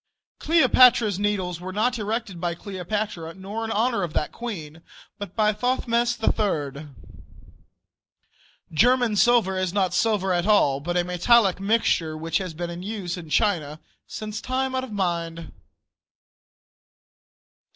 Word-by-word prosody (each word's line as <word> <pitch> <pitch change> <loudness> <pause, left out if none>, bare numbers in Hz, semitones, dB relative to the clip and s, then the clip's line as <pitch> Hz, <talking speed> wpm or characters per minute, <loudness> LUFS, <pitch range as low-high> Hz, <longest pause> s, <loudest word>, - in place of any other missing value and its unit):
Cleopatra's 250 - +4
Needles 190 -4 -1
were 185 +1 -6
not 235 +5 0
erected 210 -4 -3
by 175 -1 -1
Cleopatra, 190 -2 -4
nor 200 +4 -6
in 225 - -4
honor 225 0 +1
of 170 -4 -3
that 150 - -1
queen, 165 -10 -7 0.4
but 205 -3 -7
by 215 -1 +2
Thothmes 240 +1 0
III. 155 -10 -1 1.8
German 245 +5 +3
silver 230 -3 +3
is 185 -1 -1
not 190 -3 +1
silver 200 -3 +1
at 175 +2 0
all, 145 -10 +3
but 175 +5 -2
a 175 - +2
metallic 190 +3 +3
mixture 195 -6 +1
which 165 +1 -1
has 185 -4 -6
been 175 +1 -4
in 170 +1 -7
use 195 -3 -4
in 170 -4 -9
China 155 -6 0 0.6
time 260 +1 -2
out 260 0 -1
of 260 - -8
mind. 170 -4 -3
195 Hz, 130 wpm, -24 LUFS, 175-225 Hz, 1.8 s, Cleopatra's